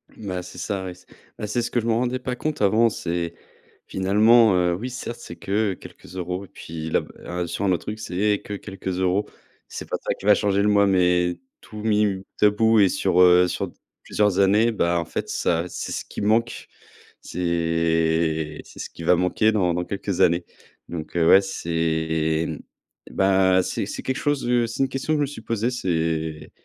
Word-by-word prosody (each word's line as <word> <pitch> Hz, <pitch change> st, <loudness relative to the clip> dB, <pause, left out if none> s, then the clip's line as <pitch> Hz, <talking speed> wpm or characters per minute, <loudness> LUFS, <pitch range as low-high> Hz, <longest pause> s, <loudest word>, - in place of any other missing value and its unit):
Bah, 95 Hz, -4 st, -5 dB
c'est 90 Hz, -, -11 dB
ça, 95 Hz, +1 st, -3 dB
ouais. 90 Hz, -, -5 dB
C 90 Hz, -, -20 dB, 0.3 s
bah, 105 Hz, -, -4 dB
c'est 120 Hz, +4 st, -1 dB
ce 120 Hz, -, -3 dB
que 120 Hz, -, 0 dB
je 110 Hz, -, -7 dB
me 115 Hz, -, +1 dB
rendais 125 Hz, +2 st, 0 dB
pas 125 Hz, 0 st, -4 dB
compte 155 Hz, -6 st, -3 dB
avant, 110 Hz, +3 st, +4 dB
c'est, 85 Hz, -4 st, -3 dB, 0.5 s
finalement, 105 Hz, +3 st, +4 dB
heu, 90 Hz, -1 st, +2 dB
oui, 115 Hz, +9 st, -4 dB
certes, 120 Hz, -1 st, -6 dB
c'est -, -, -9 dB
que 100 Hz, 0 st, -1 dB
quelques -, -, -14 dB
euros 90 Hz, +1 st, -4 dB
et -, -, -17 dB
puis 80 Hz, -2 st, -7 dB
la, -, -, +2 dB
bah, -, -, -13 dB
un 90 Hz, 0 st, -3 dB
sur 100 Hz, -, -3 dB
un 95 Hz, -, +2 dB
autre 85 Hz, -, -2 dB
truc, 105 Hz, +1 st, -5 dB
c'est 105 Hz, +1 st, 0 dB
que 105 Hz, -, -7 dB
quelques 95 Hz, -1 st, -8 dB
euros. 95 Hz, +3 st, +1 dB, 0.4 s
C'est -, -, -8 dB
pas -, -, -1 dB
ça -, -, -1 dB
qui -, -, -12 dB
va 105 Hz, -, +7 dB
changer 100 Hz, 0 st, +1 dB
le 105 Hz, -, +3 dB
mois, 100 Hz, -1 st, +4 dB
mais 90 Hz, -2 st, +2 dB, 0.2 s
tout 105 Hz, -1 st, -10 dB
mis 105 Hz, -1 st, +3 dB
m 100 Hz, -2 st, +1 dB, 0.2 s
bout -, -, 0 dB
à 105 Hz, -, +8 dB
bout 110 Hz, +1 st, +3 dB
et 100 Hz, -2 st, +5 dB
sur, 90 Hz, 0 st, +2 dB
heu, 90 Hz, 0 st, +6 dB
sur -, -, -2 dB
d -, -, -15 dB, 0.3 s
plusieurs 105 Hz, -2 st, +1 dB
années, 105 Hz, +4 st, +4 dB
bah, 85 Hz, -5 st, +1 dB
en -, -, -1 dB
fait -, -, -4 dB
ça, 85 Hz, 0 st, 0 dB
c'est -, -, -6 dB
ce -, -, -4 dB
qui -, -, -7 dB
manque. 115 Hz, +3 st, 0 dB, 0.5 s
C'est 80 Hz, -2 st, 0 dB
c'est -, -, -15 dB
ce -, -, -5 dB
qui 85 Hz, -, -11 dB
va 90 Hz, +2 st, +5 dB
manquer 90 Hz, +5 st, +2 dB
dans 90 Hz, -5 st, +1 dB
dans 90 Hz, -, -1 dB
quelques 100 Hz, -2 st, -3 dB
années, 85 Hz, +1 st, +3 dB, 0.4 s
donc 80 Hz, -1 st, -7 dB
heu, 80 Hz, -1 st, +3 dB
ouais, 95 Hz, -, +8 dB
c'est, 80 Hz, -3 st, -1 dB, 0.6 s
bah, 95 Hz, -1 st, +3 dB
c'est -, -, -3 dB
c'est -, -, -6 dB
quelque 130 Hz, -, -1 dB
chose, 145 Hz, -4 st, -1 dB
heu, 120 Hz, -1 st, +2 dB
c'est 115 Hz, -, -4 dB
1 135 Hz, -, +1 dB
question 135 Hz, +4 st, -3 dB
que -, -, +2 dB
je -, -, +1 dB
me -, -, +3 dB
suis 140 Hz, -4 st, -9 dB
posée. 115 Hz, +1 st, -1 dB
C'est 80 Hz, -7 st, -2 dB
95 Hz, 215 wpm, -23 LUFS, 85-110 Hz, 0.6 s, à